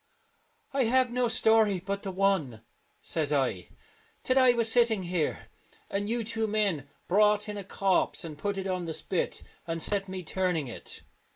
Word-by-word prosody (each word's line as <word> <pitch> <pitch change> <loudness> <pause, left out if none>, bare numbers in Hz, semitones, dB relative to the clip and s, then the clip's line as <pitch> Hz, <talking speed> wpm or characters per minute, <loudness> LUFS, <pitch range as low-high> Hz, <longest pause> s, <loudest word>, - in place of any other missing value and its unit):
" - - -41 0.3
I 270 -2 +2
have 255 +1 +3
no 250 0 +1
story 220 -4 +3
but 200 +2 -4
the 195 - -5
one," 185 - 0 0.4
says 155 -3 +1
I, 130 -11 0 0.3
" - - -33
that 255 - +1
I 255 -2 +6
was 230 -2 +2
sitting 230 -4 +3
here, 175 -3 -2 0.4
and 205 +1 -2
you 235 0 0
two 225 0 -1
men 200 -10 0 0.2
brought 210 +2 +3
in 210 - -5
a 200 - -5
corpse 195 0 +1
and 160 -3 -7
put 200 +6 -3
it 190 - -3
on 185 -2 -2
the 165 - -4
spit, 180 +2 -2 0.2
and 165 0 -2
set 195 +4 -1
me 185 -1 -6
turning 180 -3 -1
it." 120 - -8
195 Hz, 185 wpm, -28 LUFS, 170-220 Hz, 0.4 s, I